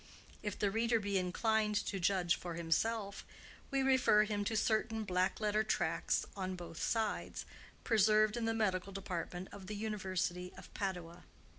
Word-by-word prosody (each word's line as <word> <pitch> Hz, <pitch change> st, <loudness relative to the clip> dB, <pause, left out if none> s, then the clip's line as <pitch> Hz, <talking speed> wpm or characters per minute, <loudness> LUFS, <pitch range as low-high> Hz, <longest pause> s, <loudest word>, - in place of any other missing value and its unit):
If 210 Hz, -2 st, -3 dB
the 200 Hz, -1 st, +1 dB
reader 230 Hz, +2 st, +2 dB
be 200 Hz, -2 st, 0 dB
inclined 210 Hz, +4 st, +1 dB
to 195 Hz, -, -2 dB
judge 180 Hz, -1 st, +2 dB
for 175 Hz, -2 st, -6 dB
himself, 200 Hz, +5 st, 0 dB, 0.5 s
we 275 Hz, -1 st, +1 dB
refer 260 Hz, -5 st, +5 dB
him 210 Hz, -1 st, -1 dB
to 220 Hz, +1 st, 0 dB
certain 220 Hz, +1 st, +1 dB
black 185 Hz, -2 st, +1 dB
letter 215 Hz, 0 st, +2 dB
tracts -, -, 0 dB
on 185 Hz, -1 st, -3 dB
both 170 Hz, -3 st, -8 dB
sides, 220 Hz, -2 st, -1 dB, 0.4 s
preserved 215 Hz, -1 st, +4 dB
in 235 Hz, -1 st, -1 dB
the 225 Hz, 0 st, +1 dB
medical 195 Hz, -3 st, 0 dB
department 180 Hz, -1 st, -4 dB
of 195 Hz, -2 st, -10 dB
the 210 Hz, -, -4 dB
University 190 Hz, -4 st, -2 dB
of -, -, -12 dB
Padua. 180 Hz, -3 st, -4 dB
205 Hz, 155 wpm, -35 LUFS, 185-220 Hz, 0.5 s, refer